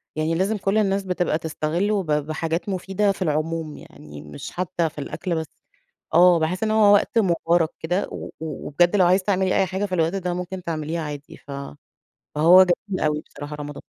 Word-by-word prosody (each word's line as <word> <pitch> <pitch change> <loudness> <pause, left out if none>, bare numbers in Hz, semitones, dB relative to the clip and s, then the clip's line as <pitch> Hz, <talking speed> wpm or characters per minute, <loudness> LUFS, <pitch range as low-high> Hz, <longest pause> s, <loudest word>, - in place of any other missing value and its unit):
يعني 155 +1 0
لازم 200 +5 0
كل 195 +2 0
الناس 195 -2 +1
بتبقى 180 -3 0
تستغله 170 +6 -1
ب - - -14
بحاجات 160 +4 -1
مفيدة 195 +2 0
في 195 - -8
العموم، 155 -1 -2
يعني 75 -1 -12
مش 75 -1 -9
حتّى 175 -2 -1
في 155 - -26
الأكل 170 +4 -3
بس 160 -1 -3 0.7
آه. 175 0 +7
باحِس 170 +5 -1
إن 215 - +1
هو 215 -2 +5
وقت 205 +3 +2
مُبارك 170 -4 +2
كده 180 +5 -1
و - - -6 0.2
و 160 -3 -6
وبجد 175 +6 +3
لو 185 - +5
عايزة 185 +2 +3
تعملي 190 -2 +1
أي 190 - +3
حاجة 190 +3 -2
في 185 - -4
الوقت 165 +1 +1
ده 180 -2 -2
ممكن 180 +1 -5
تعمليها 165 0 -3
عادي، 145 -1 -7
ف 145 - -15 0.8
فهو 170 +5 +7
جميل 185 +2 -1
أوي 150 0 +1
بصراحة 145 +1 -8
رمضان. 145 -1 -7
175 Hz, 190 wpm, -23 LUFS, 155-190 Hz, 0.8 s, آه